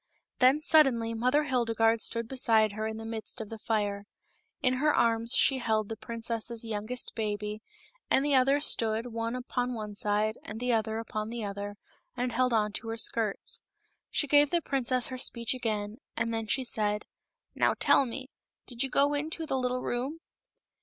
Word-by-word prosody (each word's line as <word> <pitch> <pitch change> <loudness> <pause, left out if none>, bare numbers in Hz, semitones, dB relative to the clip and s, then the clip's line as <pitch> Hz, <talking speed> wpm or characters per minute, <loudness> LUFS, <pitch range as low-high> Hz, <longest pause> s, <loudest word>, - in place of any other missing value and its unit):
Then 265 +4 +5
suddenly 265 -8 +4
Mother 250 +6 +2
Hildegarde 230 -4 +2
stood 230 -1 0
beside 225 -4 +3
her 215 +1 -3
in 220 0 -5
the 225 - -7
midst 225 +2 -4
of 220 -2 -6
the 225 - -7
fire. 205 -2 -1 0.6
In 255 0 +2
her 300 +3 +3
arms 230 0 +3
she 270 -1 +4
held 220 -3 0
the 225 - -3
princess's 230 0 -4
youngest 225 +3 -3
baby, 210 -1 -3 0.5
and 270 - +3
the 290 - +2
others 275 +3 +4
stood, 225 +1 +1
one 230 +1 -2
upon 250 0 -2
one 210 -2 -5
side 210 +1 0
and 215 +1 -7
the 250 0 +1
other 220 0 0
upon 215 -1 -4
the 235 -1 -4
other, 200 0 -5 0.4
and 250 0 -1
held 250 +2 +1
on 210 -2 +2
to 225 - -2
her 225 0 -3
skirts. 220 -2 -1 0.5
She - - +1
gave 290 0 +5
the 345 - +2
princess 255 -4 0
her 255 -1 -6
speech 235 -2 -1
again, 215 -4 -3 0.2
and 230 0 0
then 225 -1 -2
she 260 +5 +1
said, 210 -3 0 0.3
" - - -61
Now, - - +2
tell 270 - +5
me, 260 +3 -7 0.3
did 240 -1 -4
you 270 - +2
go 285 +3 +3
into 315 +3 -2
the 270 - -2
little 250 0 -1
room 260 +6 -2
230 Hz, 185 wpm, -29 LUFS, 220-255 Hz, 0.6 s, Then